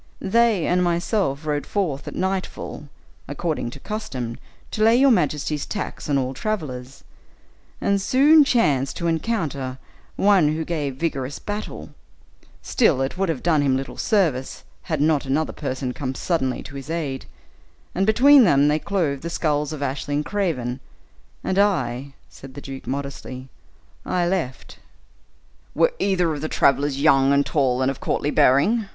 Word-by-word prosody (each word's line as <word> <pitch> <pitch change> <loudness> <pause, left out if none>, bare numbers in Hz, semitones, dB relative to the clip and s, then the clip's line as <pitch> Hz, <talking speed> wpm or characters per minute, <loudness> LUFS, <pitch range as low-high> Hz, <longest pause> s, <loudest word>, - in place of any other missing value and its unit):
They 225 -2 +2
and 180 +1 +2
myself 170 -4 0
rode 150 -1 -2
forth 170 -9 -2
at - - -6
nightfall, 190 -5 -3 0.4
according 145 -3 -3
to 130 - -10
Custom, 130 - -5 0.3
to 215 - -3
lay 225 +1 +6
your 270 +2 +5
majesty's 150 - 0
tax 205 -6 -5
on 140 - +2
all 130 -1 -1
travelers, 140 -9 -5 0.8
and 200 0 +1
soon 290 +8 +6
chanced 145 - +1
to 170 - -4
encounter 160 - -2 0.4
one 185 -7 +3
who 160 0 -3
gave 150 -6 -3
vigorous 140 -3 -3
battle; 210 +1 -6 0.7
still, 170 - +2
it 135 - -3
would 190 -1 -1
have 155 -6 -2
done 160 -4 +3
him 135 -2 +2
little 135 +1 -6
service, 165 - 0 0.3
had 155 -3 0
not 150 -2 +2
another 150 +4 0
person 130 -3 -4
come 130 -1 -4
suddenly 130 -7 -1
to 145 - -11
his 135 +1 -8
aid, 150 -5 -3 0.7
and 195 +2 0
between 265 +5 +7
them 145 -7 +4
they 150 +1 +2
clove 155 -8 -1
the 170 - -4
skulls 150 -3 -1
of 150 -2 -4
Ashley 140 +1 -3
and 150 +1 -1
Craven; 145 - -2 0.6
and 190 +1 0
I," 135 -9 0
said 135 -1 -13
the 140 - -7
duke, 135 -1 -9
modestly, 135 -1 -5 0.5
"I 180 -1 0
left." 170 -9 -3 1.0
"Were - - +3
either 180 -4 +1
of 145 - -5
the 155 - -3
travelers 140 0 +2
young, 140 -2 +4
and 140 0 +3
tall, 130 -3 +1
and 130 - +2
of 135 - -9
courtly 145 - -1
bearing?" 195 - +3
150 Hz, 160 wpm, -22 LUFS, 135-190 Hz, 1.0 s, between